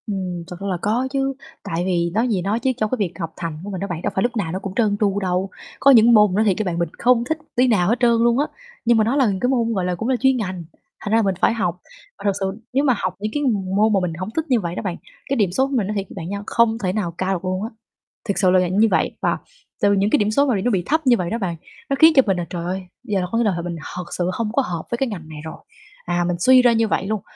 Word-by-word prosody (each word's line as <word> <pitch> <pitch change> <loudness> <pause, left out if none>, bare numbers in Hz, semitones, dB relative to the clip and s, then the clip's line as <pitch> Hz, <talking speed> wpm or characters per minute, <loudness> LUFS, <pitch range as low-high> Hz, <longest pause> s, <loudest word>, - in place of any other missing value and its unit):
Ừm, 185 -4 -3
thật 180 - -7
ra 200 - -5
là 185 -2 -1
có 235 +5 0
chứ, 270 0 0 0.3
tại 165 +1 -2
vì 170 -2 +1
nói 225 +5 +1
gì 205 -6 0
nói 200 +5 -1
chứ 260 - +1
trong 215 -3 0
cái - - +2
việc 185 -5 -1
học 165 -2 -4
thành 165 -3 -4
của 205 - -6
mình 190 - -4
đó 200 - -3
bạn 170 -2 -4
đâu - - -1
phải 190 - +1
lúc 240 0 -1
nào 175 -6 -1
nó 185 - -3
cũng 195 -1 -6
trơn 210 -4 +2
tru 200 -1 +1
đâu. 185 0 -1 0.3
Có 275 - +6
những 235 -2 +7
môn 210 -2 +6
mình - - -2
nói 215 +2 +2
thiệt 195 -3 +3
với - - +1
bạn 175 -2 -2
mình 170 -2 0
không 240 -1 +3
thích 315 - 0 0.2
tí 250 +1 +4
nào 200 -6 +2
hết 235 +2 +1
trơn 240 -1 +4
luôn 235 +2 +3
á, 290 - +2 0.4
nhưng 235 0 +4
mà 220 - +4
nó 235 +5 0
là 275 -2 +4 0.2
cái 250 - +2
môn, 235 -3 +1
gọi 190 -4 -1
là, 180 0 -1
cũng 225 +8 -3
là 260 - +3
chuyên 265 -1 +3
ngành, 185 -6 -4 0.4
thành 205 - -4
ra 225 - +4
là - - +4
mình 195 -2 0
phải - - +4
học. 180 -6 -1 0.4
Và - - -12
thật 200 - +4
sự 195 - -1 0.3
nếu 275 +2 +2
mà 265 -4 +4
học 185 -2 -2
những 215 +1 -3
cái 295 - -1
m 255 -4 +2 0.2
môn 215 +2 +3
mà 195 - +4
mình 180 -2 -2
hổng 185 +2 -4
thích 320 - 0
như 250 -3 +3
vậy 175 -3 -4
đó - - -3
bạn, 185 -4 -2 0.3
cái 275 - +1
điểm 200 -6 +2
số 265 +8 +1
của 275 - -7
mình 215 -6 +1
nói 210 - -3
thiệt 195 -1 -2
bạn 170 -2 -6
nha 200 0 -4
không 230 -1 +2
thể 185 -1 0
nào 200 -5 -2
cao 190 +1 0
được 185 0 -4
luôn 185 +1 -2
á. 225 - -3 0.6
Thực 200 - 0
sự 190 -1 +3
là 185 - +5
vậy 180 -1 +1
như 210 +4 +4
vậy - - +2
và - - +1 0.4
từ 200 0 +4
những 200 +1 +2
cái - - +4
điểm 210 0 +1
số 280 +6 +3
mà 255 -5 +1
bị 195 - -1
nó 245 - +1
bị 185 -4 0
thấp 315 +3 0
như 240 -2 +6
vậy 175 -3 -2
đó 230 - -1
bạn, 185 -6 -3 0.3
nó 275 - +1
khiến 320 0 +8
cho 270 - +8
mình 195 -3 +1
là 175 - -2
"Trời 170 -1 -5
ơi, 185 +2 -3 0.2
giờ 210 -6 -1
là 180 - -2
có 230 - 0
nghĩa 235 - +2
là 210 - +2
th - - -9
mình 175 -1 -4 0.2
thật 180 - -4
sự 175 0 0
không 215 +1 -2
có 275 - +3
hợp 175 -10 -4
với 235 - 0
cái 270 - 0
ngành 170 -7 -7
này 155 -1 -8
rồi." 160 - -6 0.5
À, 175 0 0
mình 180 - 0
suy 255 +7 +6
ra 245 -1 +4
như 225 0 +2
vậy 195 - -1
luôn, 215 -1 -2
205 Hz, 330 wpm, -21 LUFS, 180-235 Hz, 0.6 s, khiến